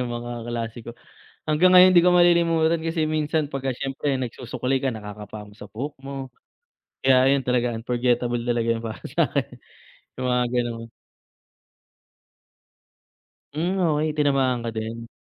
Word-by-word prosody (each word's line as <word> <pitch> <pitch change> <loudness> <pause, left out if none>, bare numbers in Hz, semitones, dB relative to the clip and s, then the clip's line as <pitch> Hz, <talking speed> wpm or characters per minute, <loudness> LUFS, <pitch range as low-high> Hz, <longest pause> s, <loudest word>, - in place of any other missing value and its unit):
ng 125 -1 -3
mga 120 0 -6 0.2
klase 115 -1 -4
ko. 120 0 -9 0.5
Hanggang 175 +5 +4
ngayon 185 0 +8
'di 175 - +7
ko 180 - +5
malilimutan 170 -2 +3
kasi 160 -1 0
minsan 155 -1 0
pagka 135 -2 -3
siyempre 135 +2 -3
nagsusuklay 125 +2 -3
ka, 130 0 -1
nakakapa 105 -1 -9
mo 105 - -17
sa - - -10
buhok 140 +7 -5
mo, 135 -1 -6 0.8
kaya 130 0 +5
yun 135 - -2
talaga 125 -1 0
unforgettable 120 +1 0
talaga 120 -1 0
yun 115 - -1
para 115 -1 -7
sa - - +2
akin, - - -3 0.6
yung 130 - -1
mga 125 0 +2
ganun. 115 -2 -2 2.7
Hmm, 175 +5 -1
okey, 155 -1 +1
tinamaan 135 -5 +1
ka 115 - -2
din. 115 +1 -5
130 Hz, 145 wpm, -24 LUFS, 120-155 Hz, 2.7 s, ngayon